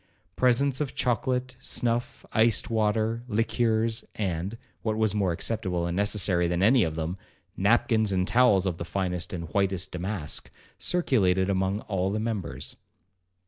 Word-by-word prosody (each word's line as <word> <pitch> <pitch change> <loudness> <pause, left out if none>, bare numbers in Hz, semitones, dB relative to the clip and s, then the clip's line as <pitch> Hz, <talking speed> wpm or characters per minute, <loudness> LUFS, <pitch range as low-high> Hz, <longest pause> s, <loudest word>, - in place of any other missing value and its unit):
Presents 130 +2 +3
of 140 -4 -3
chocolate, 125 +2 0
snuff, 120 -1 -2
iced 115 0 +3
water, 110 +1 +1
liqueurs, 115 0 +1
and 95 +1 -2 0.2
(what 110 -1 -1
was 110 -2 +1
more 100 -4 +1
acceptable 90 -1 -1
and 85 0 -2
necessary 95 -3 +2
than 85 +2 0
any 120 +2 +5
of 80 -1 -2
them) 80 +3 -3 0.4
napkins 110 +1 +2
and 90 -1 +1
towels 105 -5 +4
of 90 -3 -2
the - - -2
finest 90 -1 -2
and 85 -3 -5
whitest 95 0 0
damask, 90 -3 -3 0.3
circulated 100 - +2
among 95 +2 0
all 95 -2 -1
the 105 +2 -1
members. 105 -6 -4
105 Hz, 140 wpm, -27 LUFS, 90-115 Hz, 0.4 s, any